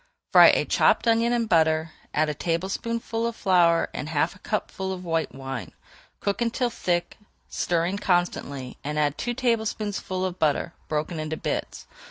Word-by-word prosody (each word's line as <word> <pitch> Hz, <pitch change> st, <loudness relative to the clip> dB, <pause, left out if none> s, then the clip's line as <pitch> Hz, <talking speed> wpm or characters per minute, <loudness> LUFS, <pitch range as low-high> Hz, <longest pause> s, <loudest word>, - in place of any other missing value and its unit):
Fry -, -, +9 dB
a -, -, +4 dB
chopped -, -, +3 dB
onion 230 Hz, +1 st, +3 dB
in 240 Hz, -1 st, +1 dB
butter, 160 Hz, -4 st, +2 dB, 0.2 s
add 155 Hz, +1 st, +1 dB
a 150 Hz, -, -1 dB
tablespoonful 225 Hz, +8 st, -2 dB
of 235 Hz, -, -4 dB
flour 175 Hz, -5 st, +3 dB
and 150 Hz, -, -5 dB
half 160 Hz, +1 st, +1 dB
a -, -, -17 dB
cupful 190 Hz, -2 st, -3 dB
of 185 Hz, -1 st, -6 dB
white 165 Hz, -1 st, -1 dB
wine. 135 Hz, -3 st, -6 dB, 0.5 s
Cook 200 Hz, +3 st, -1 dB
until 240 Hz, +1 st, 0 dB
thick, 175 Hz, -5 st, -1 dB, 0.3 s
stirring 175 Hz, +3 st, 0 dB
constantly, 140 Hz, -9 st, -1 dB
and 150 Hz, +1 st, -3 dB
add 145 Hz, -1 st, +1 dB
two 240 Hz, +7 st, -3 dB
tablespoonfuls 215 Hz, -6 st, -1 dB
of 185 Hz, -1 st, -4 dB
butter, 155 Hz, +2 st, +1 dB
broken 155 Hz, +2 st, -2 dB
into 155 Hz, 0 st, -3 dB
bits. -, -, -4 dB
175 Hz, 160 wpm, -25 LUFS, 155-215 Hz, 0.5 s, Fry